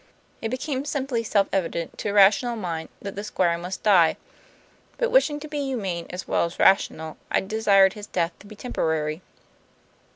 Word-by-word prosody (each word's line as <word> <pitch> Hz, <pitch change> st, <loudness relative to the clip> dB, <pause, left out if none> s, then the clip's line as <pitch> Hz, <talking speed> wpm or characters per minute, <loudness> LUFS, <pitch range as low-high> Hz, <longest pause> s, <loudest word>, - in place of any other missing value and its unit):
It 225 Hz, -, -2 dB
became 260 Hz, +2 st, -3 dB
simply 270 Hz, -4 st, -2 dB
self 205 Hz, -3 st, +2 dB
evident, 170 Hz, -3 st, -2 dB
to -, -, -2 dB
a -, -, -2 dB
rational 205 Hz, +4 st, +5 dB
mind, 170 Hz, -6 st, -4 dB
that 200 Hz, -1 st, -6 dB
the 205 Hz, -, -5 dB
Squire 180 Hz, -5 st, +1 dB
must 180 Hz, +2 st, -6 dB
die. 180 Hz, -6 st, +5 dB, 0.8 s
But 485 Hz, -1 st, 0 dB
wishing 315 Hz, -13 st, +3 dB
to 305 Hz, -, -7 dB
be 295 Hz, -1 st, -4 dB
humane 205 Hz, -11 st, -3 dB
as 180 Hz, +1 st, -7 dB
well -, -, +1 dB
as 170 Hz, -, -7 dB
rational, 160 Hz, -5 st, +2 dB
I -, -, +2 dB
desired 195 Hz, -2 st, +3 dB
his 210 Hz, -1 st, -9 dB
death 170 Hz, -3 st, -1 dB
to 205 Hz, -, -15 dB
be 215 Hz, -, -11 dB
temporary. 160 Hz, -8 st, -2 dB
200 Hz, 175 wpm, -24 LUFS, 175-240 Hz, 0.8 s, rational